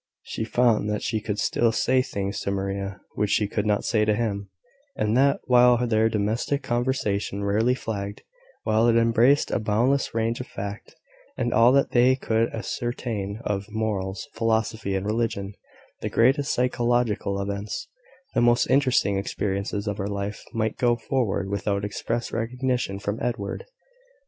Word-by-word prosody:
She 110 - -4
found 115 -3 +2
that 105 0 -2
she 110 -2 -1
could 105 0 -3
still 115 +2 +2
say 130 +3 +2
things 100 -4 -3
to - - -3
Maria 100 0 -3
which 105 - 0
she 105 - +2
could 105 +1 -2
not 105 -1 +1
say 110 -3 +2
to 105 0 +2
him; 100 -3 -2 0.5
and 105 +1 0
that, 140 +2 +3
while 125 -1 +5
their 110 -1 +2
domestic 110 +6 -1
conversation 115 -5 -1
rarely 110 +5 +2
flagged 100 -4 -5 0.4
while 110 +2 +3
it 115 - +4
embraced 115 +4 +4
a - - +1
boundless 120 +5 +1
range 115 +1 0
of 125 - -6
fact, 100 +1 -7 0.4
and 120 - 0
all 115 +3 +6
that 140 0 +3
they 125 +2 +5
could 115 -3 0
ascertain 115 -3 -4
of 100 0 -2
morals, 105 -3 -3
philosophy, 110 -2 0
and 95 0 -2
religion 105 -2 -1 0.5
the - - -3
greatest 135 +5 +3
psychological 120 -5 0
events, 100 +1 -4 0.5
the - - +2
most 120 0 +4
interesting 130 -8 +3
experiences 100 +1 -2
of 105 -1 -3
her 100 - -2
life 100 +1 -4
might 110 -2 -1
go 120 -1 +3
forward 115 -5 -1
without 100 0 -1
express 115 +3 -3
recognition 125 -2 -1
from 100 +2 -3
Edward. 115 -5 -3
110 Hz, 155 wpm, -25 LUFS, 100-120 Hz, 0.5 s, all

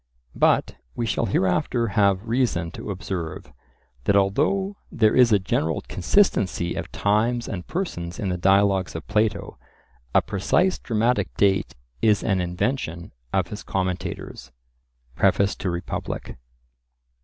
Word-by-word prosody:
But - - +2 0.2
we 120 - -1
shall 105 - 0
hereafter 95 +6 +1
have 100 0 +2
reason 115 -9 0
to - - -8
observe, 85 -6 -5 0.5
that 100 - +3
although 155 - +1
there 110 -3 +3
is 125 -2 +6
a 105 - +6
general 80 -5 -1
consistency 95 - +1
of - - -5
times 115 +4 +1
and 90 -3 -5
persons 90 - -4
in 100 - -2
the 90 - -1
Dialogues 95 -1 +3
of 80 - -6
Plato, 105 0 -1 0.6
a - - +5
precise 180 - +1
dramatic 110 -5 0
date 100 -1 +2 0.3
is 105 -2 +3
an 95 -4 +1
invention 90 -1 -2 0.2
of - - 0
his - - -6
commentators 90 -8 -4 0.6
(Preface 100 0 +3
to 95 - -2
Republic). 85 0 -4
100 Hz, 130 wpm, -24 LUFS, 90-115 Hz, 0.6 s, is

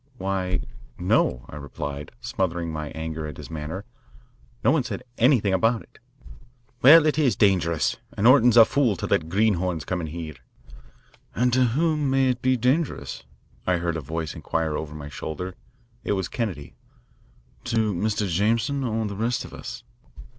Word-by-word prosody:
"Why, 95 -2 -1 0.4
no," 75 -8 +1
I 70 - -9
replied, 70 0 -6
smothering 85 -3 -2
my 75 -1 -4
anger 80 -1 -4
at 75 - -8
his - - -9
manner. 80 +6 -5 0.8
"No - - +5
one 155 -1 +3
said 125 - -5 0.2
anything 115 -6 +4
about 115 +3 +2
it." - - -23 0.8
"Well, 155 +4 +9
it 155 -1 +2
is 135 -6 +3
dangerous, 85 - +2 0.2
and 100 - 0
Orton's 125 -2 +6
a 115 - +10
fool 130 -6 +2
to - - -4
let 80 - 0
greenhorns 90 -5 +1
come 90 -2 -2
in 80 - -4
here." 80 0 -6 1.0
"And 125 +2 +2
to 130 0 +4
whom 155 -3 +1
may 135 0 +3
it 125 -1 -1
be 130 0 +2
dangerous?" 130 +6 -1 0.4
I 90 -1 +3
heard 85 -1 -2
a 80 - -3
voice 80 +2 -4
inquire 80 -2 -2
over 75 0 -5
my 75 -1 -7
shoulder. 80 +5 -5 0.5
It - - 0
was 95 -3 -1
Kennedy. 100 - -4 0.9
"To 110 -2 +1
Mr. 105 +3 -1
Jameson 115 +9 +1
or 110 -2 -1
the 100 -1 -4
rest 115 +4 -1
of - - -11
us?" - - -8
95 Hz, 165 wpm, -25 LUFS, 80-120 Hz, 1.0 s, a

